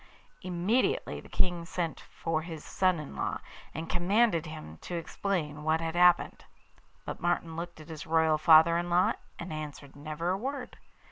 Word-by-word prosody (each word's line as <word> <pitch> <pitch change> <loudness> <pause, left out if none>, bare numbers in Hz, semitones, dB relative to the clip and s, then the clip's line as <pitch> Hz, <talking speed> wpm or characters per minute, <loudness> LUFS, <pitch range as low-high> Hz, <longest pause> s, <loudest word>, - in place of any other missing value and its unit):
Immediately 185 +8 0
the - - -15
King 175 -2 0
sent 170 -1 -3
for 160 -1 -3
his 160 -2 -8
son 185 -3 +2
in 150 - -8
law, - - -1 0.3
and 160 +1 -5
commanded 180 -1 +2
him 155 - -8
to 175 - -5
explain 165 -3 -2
what 160 +1 +2
had 165 0 -2
happened. 175 0 +4 0.6
But - - -5
Martin 170 -1 0
looked 170 0 -6
at 155 +1 -12
his 155 -2 -7
royal 160 -1 +3
father 165 +1 +7
in 175 0 -3
law, 175 +1 +4 0.2
and 170 -1 -6
answered 150 -2 -7
never 155 +4 -3
a 190 - 0
word. 265 +2 -4
170 Hz, 165 wpm, -30 LUFS, 155-180 Hz, 0.6 s, father